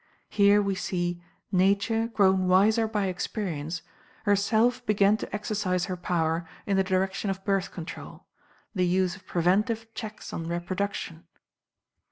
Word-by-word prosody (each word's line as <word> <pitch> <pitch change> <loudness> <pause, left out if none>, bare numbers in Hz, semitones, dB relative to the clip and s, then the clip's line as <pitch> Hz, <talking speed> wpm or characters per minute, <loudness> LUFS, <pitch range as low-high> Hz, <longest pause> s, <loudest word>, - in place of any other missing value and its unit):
Here, 205 0 +5
we 200 -1 0
see, 175 -2 -2 0.3
NATURE, 200 +4 +2
GROWN 190 -4 +3
WISER 215 +5 +4
BY 210 -2 -1
EXPERIENCE, 175 -4 -3 0.4
HERSELF 220 +5 +2
BEGAN 205 0 +4
TO - - -7
EXERCISE 205 -4 -1
HER 185 - -3
POWER 165 -2 -1 0.2
IN 200 - +1
THE 190 - +3
DIRECTION 190 +1 0
OF 195 0 -4
BIRTH 195 -2 +1
CONTROL 170 -3 -8 0.5
THE 180 -4 +1
USE 185 0 +1
OF 195 - -21
PREVENTIVE 215 +6 +1
CHECKS 215 -2 -7
ON 165 - -4
REPRODUCTION. 175 -1 -3
195 Hz, 135 wpm, -27 LUFS, 180-210 Hz, 0.5 s, Here